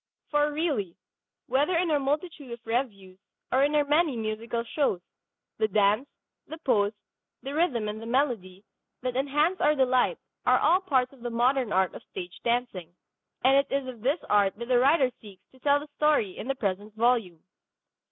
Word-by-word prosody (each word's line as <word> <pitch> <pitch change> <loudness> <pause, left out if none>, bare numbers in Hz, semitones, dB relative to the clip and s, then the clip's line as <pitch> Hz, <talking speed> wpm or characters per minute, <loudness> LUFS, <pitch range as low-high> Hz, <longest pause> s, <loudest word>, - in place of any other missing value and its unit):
For 295 0 +2
really, 290 - -2 0.5
whether 295 +6 +1
in 340 -1 +1
our 295 - +3
multitude 290 0 -3
of 235 0 -9
revues 205 -6 -3 0.3
or 260 +2 +3
in 295 +1 +2
our 295 - +4
many 295 -2 +2
musical 225 +1 -3
shows, 240 - 0 0.6
the 220 - +3
dance, 210 +5 +2 0.4
the 320 - -7
pose, 215 -9 +1 0.5
the 275 +1 -5
rhythm 290 -9 +1
and 210 +1 -5
the 225 - -7
melody 230 -8 -1 0.4
that 250 -1 -2
enhance 295 +7 +1
our 300 0 +4
delight 260 - +2 0.3
are - - +4
all 365 +3 +3
parts 265 -8 +1
of 265 - -18
the 240 - -3
modern 245 0 +1
art 190 -2 +2
of - - -9
stage 175 0 -8
dancing. 235 -8 -2 0.5
And 265 +2 +5
it 275 0 +1
is 275 -1 -1
of 245 -4 -8
this 275 +7 +1
art 200 -2 +3
that 235 +2 -8
the 250 -1 +4
writer 270 0 +4
seeks 195 -4 -14
to 260 - -21
tell 285 +2 +3
the 295 - -9
story 295 -11 +2
in - - -7
the 270 - -1
present 205 -1 -3
volume. 220 -8 +1
250 Hz, 180 wpm, -27 LUFS, 215-285 Hz, 0.6 s, And